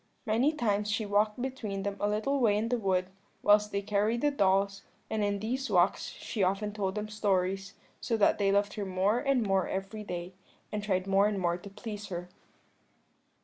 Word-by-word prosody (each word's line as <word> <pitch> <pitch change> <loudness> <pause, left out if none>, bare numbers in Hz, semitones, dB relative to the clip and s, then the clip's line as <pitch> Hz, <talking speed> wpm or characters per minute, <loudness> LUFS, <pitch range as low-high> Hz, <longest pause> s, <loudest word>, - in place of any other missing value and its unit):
Many 235 +6 +3
times 210 -7 0
she 215 +1 0
walked 210 +2 +1
between 230 -7 -3
them 200 0 -2
a 205 - +1
little 220 +7 0
way 215 -5 +3
in 220 +2 -1
the 245 0 +1
wood, 185 -2 0 0.3
whilst 210 0 +5
they 200 0 -1
carried 210 +3 +1
the 295 - +3
dolls, 195 -4 +2 0.3
and 220 -1 0
in 205 0 +1
these 255 +6 -2
walks 180 -1 +3
she 215 - -5
often 195 +3 +1
told 195 -2 -2
them 210 0 -3
stories, 195 -2 -1 0.2
so 230 - -1
that 210 - +3
they 200 -1 +3
loved 200 +1 +2
her 205 - -3
more 190 +5 +1
and 275 -3 +2
more 195 -2 +2
every 195 +3 -4
day, 180 -1 -5 0.4
and 210 - -2
tried 185 -3 0
more 195 +1 +4
and 210 -1 -1
more 175 -2 +1
to 200 - -10
please 210 0 -7
her. 175 -1 -5
205 Hz, 195 wpm, -30 LUFS, 195-215 Hz, 0.4 s, whilst